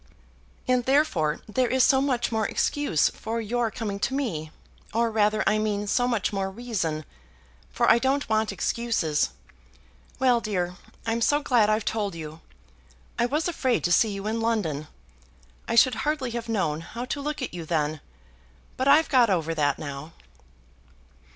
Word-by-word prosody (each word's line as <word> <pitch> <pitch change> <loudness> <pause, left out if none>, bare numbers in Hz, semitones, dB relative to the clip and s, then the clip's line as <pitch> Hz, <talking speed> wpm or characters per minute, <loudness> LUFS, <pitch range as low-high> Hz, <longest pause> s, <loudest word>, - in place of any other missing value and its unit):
"And 250 -1 +2
therefore 195 - +2
there 250 +4 +1
is 255 +1 +3
so 265 -1 +4
much 255 -4 0
more 220 -2 0
excuse 290 - +1
for 225 +1 -4
your 230 +1 -1
coming 210 -3 -4
to 265 - -1
me; 170 - -2 0.5
or 230 0 +2
rather 215 -1 +2
I 215 +1 +3
mean 210 -1 -1
so 245 +4 +1
much 225 -5 0
more 195 -1 -1
reason, 190 -9 -3 0.6
for - - 0
I 230 - +6
don't 270 +3 0
want 220 -1 +1
excuses. 195 - 0 0.9
Well, 250 -2 +3
dear, 180 -5 -2 0.3
I'm 225 +1 -1
so 290 +5 +2
glad 230 -6 +3
I've 215 0 +1
told 205 -4 -2
you. 160 0 -8 0.8
I 235 - +3
was 300 +6 0
afraid 260 -8 0
to 175 - +1
see 220 +5 +4
you 200 0 -5
in 225 +1 -1
London. 175 -11 -1 0.8
I - - -1
should 250 +2 +6
hardly 295 -4 -1
have 235 0 -5
known 165 -8 0
how 235 +8 -6
to 285 +3 -4
look 295 -1 -3
at 250 - -5
you 175 -1 -5
then. 155 -2 -1 0.8
But 260 - 0
I've 300 +3 +6
got 250 -5 +4
over 165 -4 0
that 145 -3 +1
now." 145 +2 -7
220 Hz, 165 wpm, -26 LUFS, 175-250 Hz, 0.9 s, I